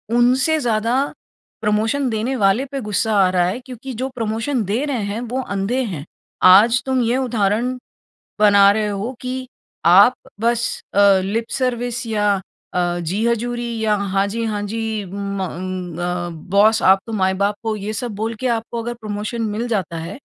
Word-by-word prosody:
उनसे 260 +6 +3
ज़्यादा 230 -2 0 0.7
प्रमोशन 220 +6 +1
देने 225 +4 -1
वाले 210 +3 +2
पे 275 -1 -3
गुस्सा 210 0 -1
आ 190 -1 +5
रहा 180 -1 +2
है 190 +7 -2
क्योंकि 255 0 -8
जो 265 - -1
प्रमोशन 225 +2 -1
दे 215 +8 -1
रहे 260 -7 -2
हैं 200 +2 -3
वो 260 +1 -1
अंधे 200 +3 -1
हैं। 170 - -5 0.5
आज 230 +5 +6
तुम 260 -1 +1
ये 235 +2 +1
उदाहरण 240 0 0 0.6
बना 200 -1 +7
रहे 215 0 0
हो 205 +4 -3
कि 255 0 -4 0.4
आप 200 +8 +7 0.3
बस 235 0 +1 0.3
अ, - - +1 0.3
लिप 225 +4 -2
सर्विस 245 -1 -1
या 210 -2 +1 0.4
अ, 175 -1 0
जी 185 +6 -2
हजूरी 240 +1 -1 0.2
या 215 -1 +3
हाँ 195 -1 0
जी, 230 +3 -3
हाँ 210 -2 -2
जी, 220 0 -3
म 200 +1 -5
अ, - - -1
उम, 185 0 -5
म 175 -2 -4
बॉस 215 +3 +4
आप 190 +1 +6
तो 225 - -6
माई-बाप 200 0 +1
हो 220 - +1
ये 210 +1 -4
सब 225 +1 -4
बोल 220 +3 -3
के 260 - -1
आपको 230 +1 -5
अगर 240 +1 -4
प्रमोशन 215 +2 -4
मिल 235 +2 -2
जाता 190 -7 -2
है, 170 +8 -7
220 Hz, 175 wpm, -20 LUFS, 200-240 Hz, 0.7 s, बना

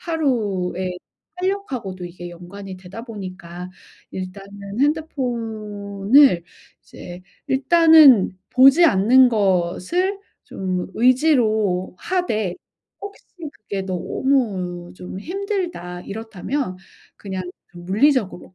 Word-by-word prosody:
하루의 200 - -1 0.4
활력 385 0 -2
하고도 190 -7 -5
이게 175 0 -8
연관이 185 +3 -10
되다 185 +5 -10
보니까 185 -5 -8 0.4
일단은 200 +3 -7
핸드폰을 225 - +1 0.4
이제 180 +1 -11 0.3
일단은 280 - +6
보지 270 +6 +6
않는 250 - +5
것을 205 - 0 0.2
좀 185 -2 -3
의지로 225 - +2
하되 220 - -1 0.5
혹시 405 0 -10 0.3
'그게 200 -2 -6
너무 185 -3 -2
좀 180 0 -8
힘들다.' 350 - -4
이렇다면 220 +2 -4 0.4
그냥 190 -2 -5 0.3
물리적으로 195 +2 0
205 Hz, 205 characters per minute, -21 LUFS, 185-270 Hz, 0.5 s, 일단은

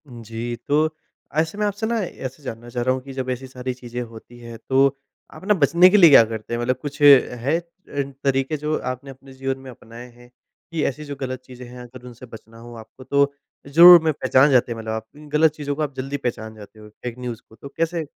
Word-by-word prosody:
जी, 115 -1 -6
तो 155 +2 +1 0.4
ऐसे 160 +5 0
मैं 210 - 0
आपसे 205 +2 -2
ना 235 0 0
ऐसे 135 -5 -8
जानना 120 -2 -8
चाह 120 0 -3
रहा 130 +1 +2
हूँ 130 - -6
कि 135 0 -10
जब 130 -1 -4
ऐसी 130 +1 -4
सारी 130 0 -5
चीज़ें 125 -1 -7
होती 120 +1 -11
हैं 115 -1 -10
तो 135 +1 +5 0.5
आप - - -13
ना 210 - +5
बचने 170 +1 +5
के 205 - +4
लिए 175 -5 +8
क्या 135 -5 +8
करते 110 0 -7
हैं? 120 - -1
मतलब 125 +2 0
कुछ 145 0 -7
है 140 0 +5
अ, - - -12 0.6
तरीके 135 +2 0
जो 150 +1 -2
आपने 130 +2 -6
अपने 135 0 -15
जीवन 135 0 -3
में 135 0 -11
अपनाए 115 +1 -12
हैं? 120 +1 -19 0.4
कि 160 -2 -2
ऐसी 145 +3 -3
जो 145 -1 -6
गलत 130 -1 -4
चीज़ें 125 -1 -11
हैं 125 +1 -11
अगर 125 0 -13
उनसे 125 +1 -12
बचना 115 -1 -14
हो 120 +1 -12
आपको 115 +3 -13
तो 140 +1 +1 0.3
ज़रूर 170 +4 +9
में 160 - +2
पहचान 130 +1 +3
जाते 125 -2 +3
हैं 115 - -4
मतलब 110 0 -5
आप, 110 0 -5
गलत 150 +1 +1
चीज़ों 145 -2 -4
को 155 - -4
आप 145 -2 -2
जल्दी 135 +2 -4
पहचान 110 -4 -5
जाते 110 0 -14
हो 105 0 -13
फ़ेक 120 +3 -9
न्यूज़ 125 -2 -6
को, 110 - -17
तो 140 +5 -11
कैसे? 165 0 -1
130 Hz, 235 wpm, -22 LUFS, 120-145 Hz, 0.6 s, ज़रूर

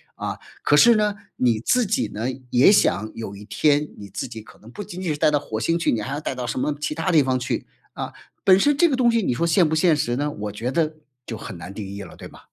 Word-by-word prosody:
啊。 - - -5 0.2
可 150 - +4
是 235 +5 +7
呢， 210 -1 +1 0.2
你 120 -3 +2
自 245 - +2
己 150 - 0
呢， 110 +4 -3 0.2
也 125 +11 +6
想 110 - +2
有 100 -3 -6
一 105 - -11
天 150 +4 +1
你 100 - -9
自 - - -4
己 115 -2 -8
可 - - -17
能 115 +3 -15
不 205 - -7
仅 185 0 -8
仅 170 -4 -1
是 - - -5
呆 - - +4
到 145 - +3
火 110 -6 -5
星 165 +9 +1
去， 170 - +1
你 115 - 0
还 130 +6 -4
要 145 - -2
呆 - - -3
到 125 -1 -5
什 - - -3
么 150 - 0
其 150 0 -3
他 165 +3 -1
地 155 -3 +5
方 130 -1 +1
去， 125 +1 -3 0.3
啊， - - -6 0.3
本 190 -1 +7
身 290 +7 +3
这 345 - +5
个 275 - +1
东 245 -2 +3
西 230 -1 +2
你 125 - 0
说 170 +8 0
现 170 0 +4
不 160 - 0
现 160 0 +4
实 120 -5 0
呢？ 145 +2 -1
我 105 -3 -5
觉 120 +5 -3
得 155 0 0 0.3
就 115 - -6
很 105 -4 -8
难 90 +4 -9
定 105 -1 -6
义 100 +1 -7
了， - - -12
对 - - -10
吗？ - - -15
145 Hz, 305 characters per minute, -23 LUFS, 115-175 Hz, 0.3 s, 是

